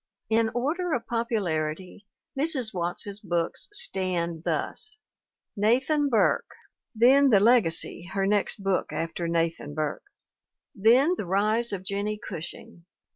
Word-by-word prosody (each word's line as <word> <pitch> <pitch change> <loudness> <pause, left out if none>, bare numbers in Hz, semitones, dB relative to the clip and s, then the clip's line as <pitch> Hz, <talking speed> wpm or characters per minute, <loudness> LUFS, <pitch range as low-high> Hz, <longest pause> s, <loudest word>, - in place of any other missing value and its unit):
In 225 0 +3
order 320 +8 -1
of 230 -2 -2
popularity 195 -7 -3 0.3
Mrs. 270 -6 +1
Watts's 185 +3 -3
books 175 -4 -2
stand 180 - 0
thus: 430 0 -2 0.6
Nathan 265 +8 +2
Burke, 230 -4 +1 0.4
then 265 +5 +5
The 210 -5 +5
Legacy, 190 -5 +2
her 195 -1 0
next 205 0 0
book 195 -2 0
after 165 +1 -3
Nathan 165 -3 -2
Burke; 155 - -3 0.6
then 245 - +4
The 185 - -4
Rise 215 +5 +1
of 195 -2 -4
Jennie 200 +2 -3
Cushing. 175 -3 -9
205 Hz, 120 wpm, -26 LUFS, 175-240 Hz, 0.6 s, then